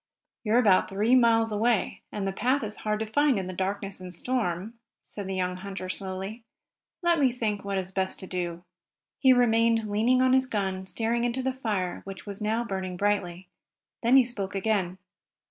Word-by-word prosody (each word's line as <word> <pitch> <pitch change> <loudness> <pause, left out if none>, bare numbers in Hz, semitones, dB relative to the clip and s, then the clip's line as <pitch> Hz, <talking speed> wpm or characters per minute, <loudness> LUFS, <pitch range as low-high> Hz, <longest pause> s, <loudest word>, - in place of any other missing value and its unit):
"You're 220 +1 +2
about 205 -7 +4
three 210 +5 +1
miles 230 -3 +4
away, 215 0 +1
and 205 -2 -3
the - - 0
path 255 +7 +1
is 215 0 -3
hard 215 0 -1
to - - 0
find 285 +3 +2
in 190 - -2
the 185 - -5
darkness 195 +1 -3
and 185 -1 -8
storm," 205 -1 -2 0.3
said 205 -2 -7
the 190 - -3
young 180 -1 -1
hunter 190 -1 -6
slowly. 195 +4 -5 0.6
"Let 340 -2 +3
me 265 -3 +4
think 215 -4 -2
what 200 -1 -2
is 190 0 -3
best 190 0 -2
to - - -6
do." 175 -2 -4 0.6
He 265 - +6
remained 230 -2 +4
leaning 220 +5 +2
on 260 0 +4
his 260 0 +3
gun, 190 -4 -2
staring 230 +3 -1
into 245 +2 -1
the 260 0 0
fire, 210 -8 -2
which 195 -3 -9
was 200 0 -7
now 220 +3 0
burning 190 -4 -4
brightly. 185 -3 -1 0.5
Then 245 +3 +5
he 260 - +6
spoke 200 -5 -5
again. 195 -3 0
210 Hz, 190 wpm, -27 LUFS, 190-235 Hz, 0.6 s, He